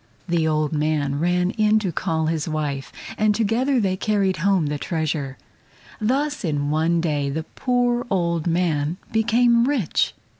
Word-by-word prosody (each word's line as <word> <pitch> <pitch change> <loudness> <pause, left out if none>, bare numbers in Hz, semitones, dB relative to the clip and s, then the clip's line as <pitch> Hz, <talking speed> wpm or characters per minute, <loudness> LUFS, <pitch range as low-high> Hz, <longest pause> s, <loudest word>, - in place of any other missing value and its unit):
The 170 -2 +1
old 155 -1 0
man 150 -2 0
ran 180 +2 +1
in 215 -1 +3
to 200 -5 -1
call 160 0 -1
his 160 -1 -1
wife, 145 -3 -3 0.3
and 210 -1 +3
together 240 +5 +1
they 190 -4 +1
carried 195 -2 0
home 185 0 +2
the 145 0 -2
treasure. 150 -5 -2 0.6
Thus 280 +7 0
in 145 -4 -1
one 165 +2 +1
day 145 -4 -1
the 160 +3 -3
poor 245 +4 0
old 170 -4 0
man 165 -2 0
became 235 +1 +3
rich. 260 - 0
170 Hz, 150 wpm, -22 LUFS, 155-215 Hz, 0.6 s, in